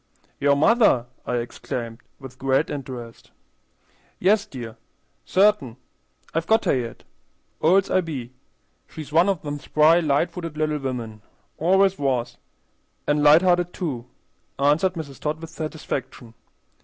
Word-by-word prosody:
"Your 140 0 +3
mother!" 155 - +4 0.2
I 125 - -1
exclaimed, 120 -1 -5 0.2
with 130 -2 -11
great 135 +4 +1
interest. 125 -5 -8 0.9
"Yes, 205 +3 +2
dear, 120 - -8 0.5
cert'in; 190 - +2 0.6
I've 165 +1 -1
got 220 0 +3
her - - +3
yet, 120 -3 -5 0.6
old's 185 +5 +3
I 185 - +3
be. 135 -8 -6 0.5
She's 155 -1 -9
one 170 +5 +5
of 190 -5 -1
them 145 -1 -4
spry, 155 +4 +4
light 150 0 +1
footed 165 -4 -7
little 155 -1 0
women; 120 -5 -5 0.4
always 190 +3 +3
was, 130 -4 -1 0.7
an' 150 0 +1
light 150 +4 +7
hearted, 175 -1 +2
too," 130 -9 -4 0.5
answered 150 +7 +2
Mrs. 155 -6 -8
Todd, 155 +1 -2
with 165 0 -9
satisfaction. 155 -7 -6
150 Hz, 130 wpm, -23 LUFS, 130-175 Hz, 0.9 s, light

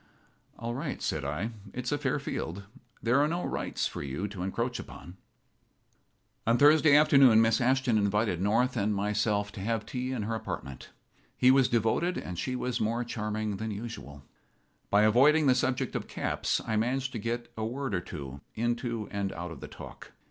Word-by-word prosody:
"All 115 +1 -4
right," 140 +3 -4
said 75 - -2
I. 75 +11 -2 0.2
"It's 125 -1 -3
a 145 - +1
fair 145 0 0
field. 100 - -4 0.4
There 125 +4 +3
are 145 - +4
no 170 +3 -2
rights - - -2
for - - -4
you 70 +9 -3
to 95 -2 -7
encroach 115 +6 -2
upon." 90 +2 -10 1.3
On 115 +1 +4
Thursday 145 +1 +6
afternoon 140 -6 +7
Miss 115 0 +3
Ashton 130 -2 +2
invited 100 -3 +1
North 115 +6 +2
and 105 -2 +1
myself 105 0 0
to - - -9
have 110 +1 -1
tea 130 -1 -3
in 125 -5 -2
her 110 +2 -2
apartment. 70 - -6 0.5
He 125 - +6
was 135 -2 +5
devoted, 120 +10 +1
and 90 -1 -5
she 130 +5 -2
was 125 -1 -2
more 115 +3 0
charming 110 -3 -3
than 110 +2 -4
usual. 100 - -7 0.7
By 105 +1 +4
avoiding 140 +8 +5
the 130 - +6
subject 130 0 -1
of - - -3
caps - - -1
I 110 - 0
managed 130 +4 0
to 115 - -4
get 120 +2 -4
a 110 - -4
word 130 +1 -3
or 90 - 0
two 70 -5 -8
into 120 -1 -2
and 100 -1 -2
out 85 +1 -6
of 80 - -9
the - - -8
talk. - - -11
115 Hz, 185 wpm, -29 LUFS, 100-130 Hz, 1.3 s, afternoon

